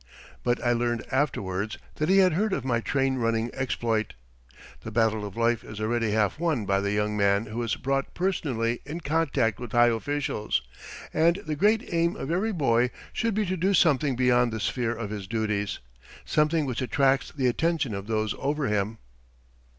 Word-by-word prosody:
But 120 0 +1
I 120 - +4
learned 120 -1 -1
afterwards 110 -7 -1 0.2
that 155 +2 0
he 195 - +5
had 185 -3 +5
heard 205 +4 +1
of - - -2
my 120 -3 +1
train 135 +4 0
running 115 -1 0
exploit. 115 - -1 0.6
The - - -7
battle 110 -2 +1
of 100 - -11
life 115 0 +1
is 110 - -9
already 115 +1 0
half 105 +4 +1
won 160 -10 0
by 100 0 +2
the 100 0 -1
young 105 0 0
man 100 +1 +2
who 115 +2 -4
is 115 -3 -1
brought 135 0 -2
personally 130 -11 -1
in 155 +5 -6
contact 145 - +1
with 120 -3 -7
high 120 0 +6
officials; 115 - -1 0.5
and 165 +2 +4
the 155 -1 -2
great 210 +7 +2
aim 170 +1 +2
of 135 - -4
every 195 +6 +1
boy 125 - +2 0.2
should 230 -3 0
be 215 0 +1
to 185 0 -1
do 190 +3 +2
something 145 -5 +3
beyond 125 -1 +3
the 110 - -3
sphere 120 +2 -1
of 110 -2 -5
his 100 -3 -5
duties 105 -2 -1 0.5
something 155 0 +2
which 130 -1 -3
attracts 135 +1 +2
the 135 -4 -2
attention 150 0 +1
of 100 0 -5
those 110 -2 0
over 145 +1 -1
him. 105 +1 -1
120 Hz, 185 wpm, -26 LUFS, 110-150 Hz, 0.6 s, high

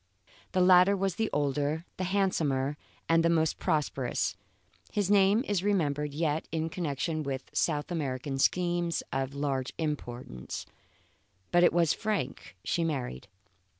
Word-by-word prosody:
The 185 - +3
latter 180 +2 +6
was 195 -1 0
the 220 -1 0
older, 145 +3 0
the 185 - -1
handsomer, 155 -8 +1 0.3
and 165 0 +4
the 170 - +4
most 160 -2 +1
prosperous 140 -8 0 0.6
(his 205 -2 0
name 200 +3 +5
is 200 -3 0
remembered 150 -8 +1
yet 155 +1 -1
in 160 0 -1
connection 160 -2 -2
with 135 -2 -4
South 150 +1 0
American 135 -4 -2
schemes 175 +2 +1
of 135 +1 -2
large 135 -2 -2
importance), 120 - -4 0.9
but 175 0 +5
it - - +6
was 170 -2 +3
Frank 215 -2 -3
she 170 - 0
married. 130 - -3
160 Hz, 135 wpm, -29 LUFS, 140-180 Hz, 0.9 s, latter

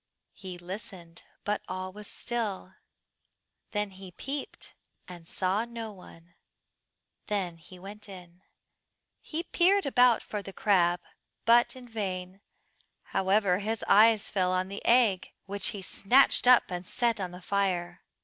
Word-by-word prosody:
He 185 -2 -8
listened, 175 -2 -9 0.2
but 210 0 -1
all 185 0 -5
was 210 +1 -10
still; 210 -6 -4 1.0
then 210 -2 -2
he 190 -1 -11
peeped, 275 +9 -6 0.3
and 175 -3 -11
saw 190 +5 0
no 230 -2 -7
one; 175 -3 -16 0.9
then 190 -5 -2
he 180 +3 -14
went 205 +3 -10
in. 180 -2 -12 0.8
He 325 +2 -4
peered 385 +3 +3
about 250 -3 +4
for 210 - -5
the 195 -1 -9
crab, 175 -5 +2 0.4
but 235 +2 +5
in 255 -1 -11
vain; 190 -4 -4 0.7
however, 195 -1 +2
his 220 +2 -3
eyes 220 +1 +5
fell 185 -2 0
on 185 +1 0
the 200 - -6
egg, 230 -6 +3
which 200 +1 -2
he 200 -2 -4
snatched 245 +7 +4
up 250 -5 +6
and 175 0 -3
set 235 +3 0
on 185 -2 -3
the 180 0 -10
fire. 180 -2 -1
195 Hz, 140 wpm, -29 LUFS, 185-225 Hz, 1.0 s, up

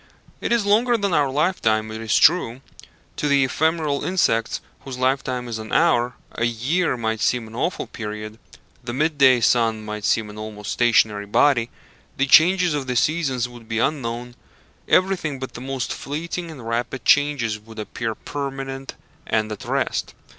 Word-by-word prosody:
It - - -3
is 235 -3 +2
longer 230 +4 +3
than 200 -4 -1
our 145 -3 +3
lifetime, 125 -8 +1
it 110 +1 -6
is 110 -2 +2
true. 135 -8 +4 0.6
To 150 - -1
the 140 -1 +4
ephemeral 155 +1 0
insects 115 -11 +1 0.2
whose 130 -2 -8
lifetime 130 -1 -1
is 115 -2 -4
an 110 0 -8
hour, 125 -7 +2 0.2
a 115 - -1
year 130 +7 0
might 110 -1 -2
seem 120 -3 +1
an 110 - -13
awful 170 +10 -2
period, 105 0 -7 0.4
the 120 0 -5
mid 150 +1 0
day 130 -3 +6
sun 115 -2 +2
might 105 0 -5
seem 110 -1 +1
an 105 - -10
almost 105 -1 -6
stationary 110 -4 +2
body, 120 +1 +3 0.5
the 135 - +2
changes 175 +4 +5
of 140 -3 -3
the 125 - -2
seasons 135 -3 +1
would 120 -2 -14
be 115 - -2
unknown, 120 -2 -2 0.5
everything 180 -6 +2
but 130 0 -7
the 120 - -8
most 130 -1 -3
fleeting 170 +4 -5
and 135 -8 -9
rapid 120 +3 -3
changes 140 -7 +3
would 110 +1 -15
appear 110 +1 -4
permanent 135 -1 -6 0.3
and 110 -1 0
at 105 - -7
rest. - - -2
125 Hz, 170 wpm, -22 LUFS, 115-150 Hz, 0.6 s, day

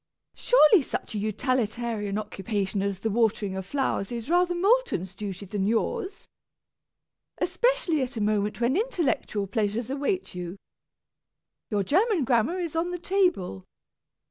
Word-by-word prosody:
Surely 390 -7 +5
such 255 - -5
a 210 - -2
utilitarian 220 -2 -1
occupation 205 -1 -2
as 200 -1 -1
the 225 - 0
watering 210 -3 +1
of 190 -1 -5
flowers 260 -6 -1
is 235 +5 -4
rather 355 0 +3
Moulton's 385 - +1
duty 200 0 -6
than 195 0 -2
yours? 380 - -1 1.1
Especially 475 - +1
at 250 -2 -3
a - - -1
moment 210 0 0
when 240 +3 +2
intellectual 340 - 0
pleasures 220 +3 -1
await 290 +8 -2
you. 180 +1 -6 1.1
Your 205 -2 +1
German 370 - +2
grammar 245 +7 +2
is 340 -3 -3
on 330 +2 0
the 355 - -3
table. 350 - 0
235 Hz, 135 wpm, -26 LUFS, -, 1.1 s, Surely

